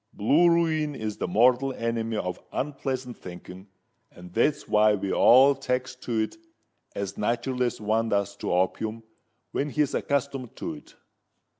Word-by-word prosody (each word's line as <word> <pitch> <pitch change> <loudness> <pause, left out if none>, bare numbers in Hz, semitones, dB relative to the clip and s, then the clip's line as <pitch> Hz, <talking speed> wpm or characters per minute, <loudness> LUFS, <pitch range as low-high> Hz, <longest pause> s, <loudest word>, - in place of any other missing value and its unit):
Blue 150 +12 +4
ruin 160 -3 +1
is 110 -4 -4
the - - -2
mortal 125 +7 +3
enemy 115 -2 -2
of 90 -3 -3
unpleasant 130 -3 -3
thinking—and 90 0 -13
that's 145 +7 +1
why 105 0 +4
we 100 -1 -3
all 135 +3 +7
takes 125 -1 -2
to 115 -3 -2
it 110 - -4 0.6
as 100 -1 -4
nat'ral 120 +4 -1
as 125 -1 0
one 110 +2 0
does 100 -1 0
to - - -3
opium 110 +5 -1 0.5
when 145 - -1
he's 145 0 0
accustomed 140 -3 -2
to - - -5
it." - - -14
115 Hz, 145 wpm, -26 LUFS, 105-135 Hz, 0.6 s, all